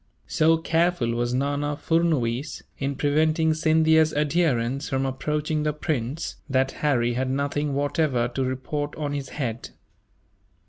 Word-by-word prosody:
So 160 +1 +3
careful 165 -6 +1
was 120 +1 -1
Nana 145 +2 -1
Furnuwees, 150 -7 0 0.2
in 140 0 -2
preventing 155 +3 +2
Scindia's 160 0 +3
adherents 140 -4 +1
from 135 0 0
approaching 150 +3 -1
the 150 0 0
prince, 150 -1 -3
that 130 0 +2
Harry 120 -5 +2
had 130 +2 -1
nothing 140 +1 -1
whatever 140 -3 +1
to 130 +2 -2
report 140 +3 -3
on 150 -2 -3
this 140 -2 -4
head. 125 -5 -4
145 Hz, 130 wpm, -25 LUFS, 130-155 Hz, 0.2 s, So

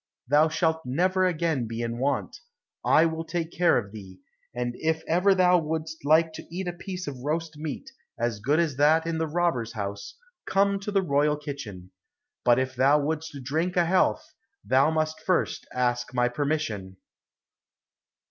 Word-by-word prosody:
Thou 150 +4 +4
shalt 160 0 0
never 185 +8 +1
again 160 -8 -1
be 115 +1 -4
in 115 0 -3
want, 140 +2 -1 0.4
I 160 - +5
will 160 0 -2
take 165 0 -3
care 175 -1 +3
of 100 -4 -3
thee. 95 -4 -11 0.3
And 120 0 -3
if 160 0 -1
ever 185 +4 +3
thou 180 -1 +5
wouldst 160 0 -4
like 160 +2 +4
to - - -9
eat 180 +2 -5
a 175 - -2
piece 180 +1 -6
of 135 -3 -6
roast 155 +3 -3
meat, 155 - -6 0.3
as 120 -2 -1
good 140 +9 +1
as 155 -6 0
that 155 +3 +4
in 165 -1 -2
the 160 - 0
robber's 155 -8 0
house, 100 - -6 0.3
come 200 +1 +2
to 200 +1 -5
the 195 -1 +2
royal 150 -1 +2
kitchen. 115 -11 -8 0.5
But 120 -1 +5
if 130 0 -1
thou 135 +4 +4
wouldst 150 -1 -3
drink 160 +7 -1
a 175 - +4
health, 185 +2 +1 0.3
thou 135 +3 +4
must 155 0 -1
first 185 -2 -1
ask 125 0 -1
my 125 0 +2
permission." 120 -9 -2
155 Hz, 170 wpm, -26 LUFS, 125-165 Hz, 0.5 s, I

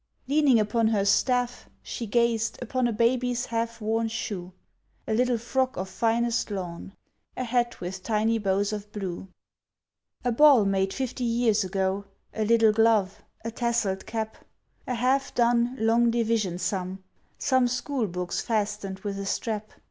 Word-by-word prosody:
Leaning 280 -4 +4
upon 220 +2 +2
her 210 -3 +1
staff, 245 +3 +1
she 230 - -5
gazed 235 0 +1
Upon 250 0 0
a - - 0
baby's 245 +2 +1
half 230 0 -3
worn 225 +1 0
shoe; 200 -5 -4 0.6
A 220 - 0
little 245 +1 +2
frock 260 +3 -1
of 190 +1 -3
finest 235 +2 0
lawn; 185 -2 -6 0.4
A 255 - -1
hat 240 0 0
with 185 +1 -5
tiny 220 +2 +1
bows 200 +1 0
of 210 0 -6
blue; 190 -3 -5 1.0
A 245 - +2
ball 270 -3 +6
made 195 0 +1
fifty 255 0 -3
years 230 -3 +2
ago; 190 +1 -1 0.3
A 220 - -1
little 225 0 +5
glove; 220 -3 +2 0.2
a 230 - -2
tasselled 235 -5 -1
cap; 220 -1 -4 0.5
A 250 - -1
half 260 +3 +1
done 240 +1 +2
"long 230 +2 +3
division" 225 -6 0
sum; 185 0 -3 0.3
Some 260 -2 +2
school 250 -1 -1
books 180 0 -3
fastened 205 -3 -2
with 200 -1 -4
a 200 - -4
strap. 215 0 -2
225 Hz, 150 wpm, -26 LUFS, 200-240 Hz, 1.0 s, ball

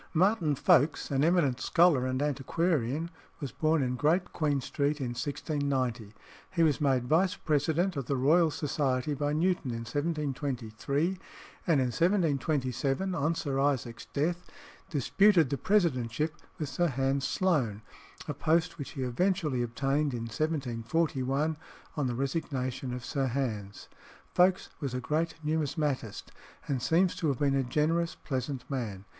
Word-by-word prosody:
Martin 175 -4 +3
Folkes, 145 +3 +3
an 135 0 +2
eminent 160 -7 +2
scholar 165 -7 +4
and 130 +2 -1
antiquarian, 150 +1 0 0.3
was 140 -5 -5
born 155 -2 +1
in 125 0 -1
Great 160 +7 +1
Queen 150 -4 +1
Street 145 +3 -1
in 130 -3 -2
1690. 130 -4 -2 0.4
He 170 -2 +1
was 155 -1 +2
made 130 -4 +2
vice 170 +8 +2
president 160 +5 0
of 135 -4 -4
the 140 - 0
Royal 160 +6 +4
Society 145 -2 -1
by 145 +1 -1
Newton 170 -2 +1
in 115 -1 -4
1723, 145 - -2 0.5
and 160 -5 +4
in 130 -1 +1
1727, 150 - +1
on 165 0 0
Sir 140 -4 -2
Isaac's 130 -4 -1
death, 170 +5 -1 0.5
disputed 170 - +3
the 140 - 0
presidentship 155 - +1 0.3
with 155 - -3
Sir 175 +6 +1
Hans 135 -1 0
Sloane, 130 - 0 0.4
a - - -2
post 165 +1 +1
which 140 - -6
he 135 -4 -3
eventually 150 +1 0
obtained 135 +4 0
in 120 - -4
1741, 135 +3 -1 0.4
on 145 -4 0
the 120 - -2
resignation 130 -2 -2
of 125 0 -5
Sir 135 -2 -1
Hans. 110 -6 -3 0.5
Folkes 185 +1 +3
was 135 -5 -3
a - - -1
great 160 +5 -1
numismatist, 150 - -2 0.4
and 135 -3 -1
seems 175 +8 +2
to 165 - -1
have 140 -4 +1
been 140 0 +2
a 135 - +2
generous, 160 +6 0
pleasant 130 -2 -4
man. 110 -8 -4
145 Hz, 145 wpm, -30 LUFS, 130-160 Hz, 0.5 s, scholar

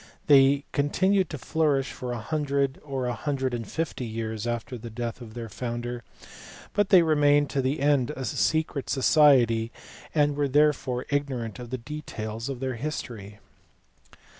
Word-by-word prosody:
They 140 0 +5
continued 185 +7 +2
to 150 - -5
flourish 140 -1 0
for 125 -1 -5
a 120 - -3
hundred 140 +1 -1
or 135 -3 -3
a 125 - -1
hundred 130 0 -2
and 115 -3 -4
fifty 160 -5 -3
years 110 0 -4
after 120 +1 -3
the 115 0 -8
death 115 +2 -5
of 110 -1 -10
their 115 -1 -5
founder, 120 +2 -5 0.7
but 205 -1 +1
they 185 -4 +7
remained 145 -2 +3
to 135 - +1
the 135 +3 -1
end 140 -3 +2
a 130 - -4
secret 155 0 0
society, 125 -5 +4 0.4
and 145 -1 +3
we 145 0 +1
are - - -2
therefore 135 -3 +2
ignorant 130 -7 -2
of 120 -1 -8
the 130 - -3
details 115 -4 -6
of 135 -2 -5
their 130 -2 -2
history. 110 -7 -5
135 Hz, 165 wpm, -26 LUFS, 120-145 Hz, 0.7 s, they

